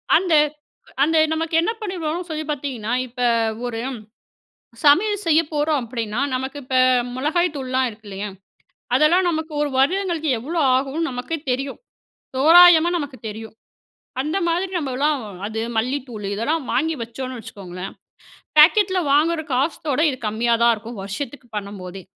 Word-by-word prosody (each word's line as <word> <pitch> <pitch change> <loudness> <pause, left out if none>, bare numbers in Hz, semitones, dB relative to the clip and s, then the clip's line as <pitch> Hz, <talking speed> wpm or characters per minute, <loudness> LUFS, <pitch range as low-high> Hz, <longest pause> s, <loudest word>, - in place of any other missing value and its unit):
அந்த 355 -2 +2 0.7
அந்த 320 +2 +2 0.2
நமக்கு 320 0 -2
என்ன 345 - 0
பண்ணிருவோன்னு 350 -4 -3
சொல்லி 310 -1 -3
பார்த்தீங்கன்னா, 255 -6 -3
இப்ப 250 +1 -8 0.4
ஒரு 235 -2 -3 1.1
சமையல் 410 +8 +4
செய்ய 320 -1 +5
போறோம் 300 0 +1
அப்பிடின்னா, 230 -1 -4
நமக்கு 265 +3 -3
இப்ப 260 0 -1 0.4
மொளகாய்த்தூள்லாம் 275 -3 0
இருக்கு 215 0 -16
இல்லயா? 200 +1 -5 0.7
அதெல்லாம் 345 +5 +4
நமக்கு 315 -1 -3
1 295 -1 0
வருடங்களுக்கு 335 +1 +1
எவ்ளோ 310 +9 -4 0.2
ஆகுன்னு 275 +5 0
நமக்கே 250 +6 -4
தெரியும். 270 +2 -2 0.6
தோராயமா 335 +3 +7
நமக்கு 285 -5 -5
தெரியும். 220 +1 -8 0.7
அந்த 305 +6 -2
மாதிரி 355 +3 0
நம்மலாம் 285 0 0 0.3
அது 220 +1 -4 0.2
மல்லித்தூள் 245 -2 -2
இதெல்லாம் 295 +10 -1
வாங்கி 320 +5 +1
வச்சோன்னு 255 +3 -6
வச்சுக்கோங்களேன், 185 -3 -8 0.6
பேக்கெட்ல 375 +4 +6
வாங்குற 315 +3 +3
காசோட 280 +1 -1
இது 260 - -5
கம்மியா 230 +3 +1
தான் 235 0 +6
இருக்கும். 225 +2 -9
வருஷத்துக்கு 245 +7 -6
பண்ணம்போதே. 195 -2 -7
280 Hz, 125 wpm, -21 LUFS, 235-325 Hz, 1.1 s, தோராயமா